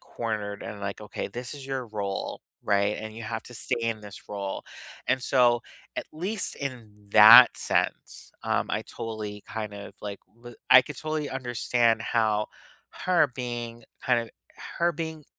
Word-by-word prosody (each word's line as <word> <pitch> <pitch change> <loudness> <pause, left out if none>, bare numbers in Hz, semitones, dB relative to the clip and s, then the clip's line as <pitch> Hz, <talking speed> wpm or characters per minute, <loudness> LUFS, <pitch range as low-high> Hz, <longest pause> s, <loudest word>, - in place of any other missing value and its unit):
cornered 105 -3 -4
and 100 - -7
like, 100 +1 -4
"Okay, 105 -1 -5
this 125 +3 -6
is 140 -2 -9
your 135 -2 -3
role, 100 -3 -4 0.2
right? 100 0 +2
And 110 0 -7
you 115 - -7
have 115 0 -4
to 125 - -11
stay 115 - -2
in 115 -1 -1
this 105 -1 -10
role." 100 -1 -4 0.4
And 130 +1 +1
so 120 -3 +3 0.3
at - - -2
least 190 +6 -2
in 125 -6 -6 0.2
that 115 +3 +10
sense, - - -1
um, - - 0
I - - -1
totally 105 -2 -6
kind 110 -2 -4
of, 100 0 -9
like, 100 -1 -5 0.2
li 120 0 -12 0.2
I 130 0 +10
could 145 0 -8
totally 155 -2 -3
understand 120 -2 +1
how 110 -3 +1 0.6
her 180 -5 +4
being 120 -2 -5 0.2
kind 125 -2 +3
of 115 - -8 0.5
her 170 0 +3
being 160 -1 -5
115 Hz, 165 wpm, -27 LUFS, 105-130 Hz, 0.6 s, that